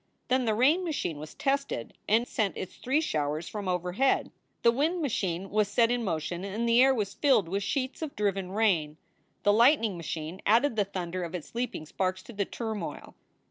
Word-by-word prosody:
Then 255 0 +2
the 220 -2 +1
rain 290 +11 +4
machine 285 - -2
was 155 +1 -9
tested 275 - -1 0.2
and 230 +3 +3
sent 210 -5 -1
its 190 - -5
three 275 +5 +1
showers 155 - -1
from 205 -3 -5
overhead. 180 +8 +1 0.3
The 235 - +6
wind 310 +9 0
machine 195 - -2
was 210 0 +2
set 230 +3 +3
in 245 -1 0
motion 175 -1 -2
and 210 +4 -2
the 235 +1 +5
air 270 +1 +6
was 210 -6 -1
filled 265 - +3
with 195 +4 -1
sheets 260 +7 -2
of 310 -3 -4
driven 195 -3 -1
rain. 180 -8 +1 0.5
The 205 - +5
lightning 230 - +4
machine 165 +1 -5
added 230 +4 +3
the 205 -2 +2
thunder 185 -2 -4
of 170 +1 -5
its 170 - -7
leaping 235 -9 -3
sparks 185 +3 -2
to 240 - -11
the 200 -1 -1
turmoil. 215 -10 -5
205 Hz, 190 wpm, -29 LUFS, 180-245 Hz, 0.5 s, The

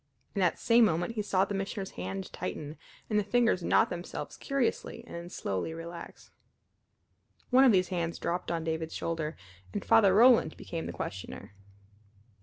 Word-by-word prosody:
In 200 - -2
that 180 -3 +2
same 230 0 +5
moment 175 +3 0
he 220 - -1
saw 195 -2 +2
the - - -5
Missioner's 195 0 -3
hand 95 +2 -5
tighten, 150 0 -5 0.3
and 210 -1 +2
the - - 0
fingers 235 -3 +2
knot - - +3
themselves 175 +1 -5
curiously 260 -3 -2
and - - -12
then 170 +1 -6
slowly 100 - -3
relax. 170 +1 -9 1.2
One 260 +2 +7
of 255 - +7
these 185 -3 +3
hands 170 -3 -2
dropped 175 +1 -2
on 165 -1 -1
David's 160 0 -3
shoulder, 160 -1 -3 0.4
and - - -3
Father 200 -4 +5
Roland 230 -7 +6
became 165 -1 -5
the - - -4
questioner. 100 +1 -7
180 Hz, 165 wpm, -30 LUFS, 165-215 Hz, 1.2 s, One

